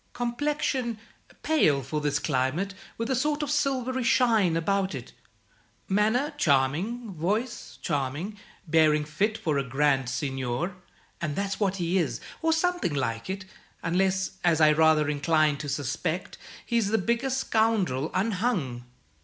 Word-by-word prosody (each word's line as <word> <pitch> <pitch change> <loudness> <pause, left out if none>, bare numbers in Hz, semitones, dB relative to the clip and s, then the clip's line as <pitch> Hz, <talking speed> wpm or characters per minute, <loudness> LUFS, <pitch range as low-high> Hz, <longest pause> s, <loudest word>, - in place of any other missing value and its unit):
Complexion, 245 -1 -1 0.5
pale 155 - +3
for 150 +4 -3
this 145 -1 +1
climate, 150 +8 -1 0.2
with 230 +3 -2
a - - +2
sort 295 +4 0
of 295 - -2
silvery 260 -3 0
shine 225 -8 +3
about 190 0 0
it. 125 -3 -8 0.7
Manner 220 +9 +2
charming, 170 - +1
voice 210 +9 -2
charming, 145 +7 -2 0.3
bearing 155 -1 +4
fit 200 +9 0
for 155 -10 0
a - - 0
grand 135 0 +1
seigneur; 135 +5 -2 0.5
and 155 -4 -2
that's 195 0 -2
what 195 -3 +1
he 180 0 +1
is, 130 -9 -1 0.2
or 325 0 +2
something 335 - +1
like 115 0 -2
it, 190 0 -4 0.4
unless, 190 +2 0
as 170 -2 +3
I 155 -1 +6
rather 155 -1 +4
incline 150 0 +2
to 145 - -5
suspect, 145 +6 -2 0.3
he's 235 -4 +1
the 220 +2 +2
biggest 235 +6 0
scoundrel 215 - +1
unhung." 185 - 0
180 Hz, 135 wpm, -27 LUFS, 150-230 Hz, 0.7 s, I